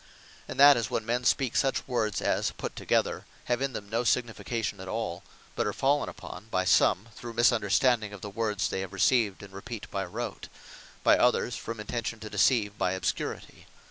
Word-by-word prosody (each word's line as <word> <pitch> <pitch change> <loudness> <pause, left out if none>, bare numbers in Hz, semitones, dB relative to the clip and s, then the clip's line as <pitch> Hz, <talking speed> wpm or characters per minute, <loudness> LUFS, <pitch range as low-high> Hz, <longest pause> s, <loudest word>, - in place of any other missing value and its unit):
And 130 - -7
that 145 -1 +9
is, 115 -4 -1
when 115 - -2
men 120 +2 0
speak 130 -1 +2
such 135 - +1
words, 115 -6 -1
as - - +1
put - - -6
together, - - 0 0.2
have 120 +1 -1
in 135 -1 -1
them 105 -2 -6
no 115 +3 -1
signification 115 -3 -1
at 95 - -8
all; 100 -3 -3 0.3
but - - 0
are - - -1
fallen 140 +2 +1
upon 110 - -10
by 95 -3 0
some, 100 +3 +3
through 120 -1 -8
misunderstanding 115 -1 +3
of 100 -2 -10
the 105 - -6
words 105 -1 -1
they - - -3
have 95 0 -6
received, 105 -1 +2
and 100 -1 -12
repeat 105 +3 -7
by 100 -1 -2
rote; 110 +4 -5 0.6
by - - +5
others, 125 -1 +2
from 115 -1 -6
intention 115 +1 -4
to 110 - -7
deceive 105 0 +2
by 90 - +1
obscurity. 95 - -4
110 Hz, 190 wpm, -28 LUFS, 100-120 Hz, 0.6 s, that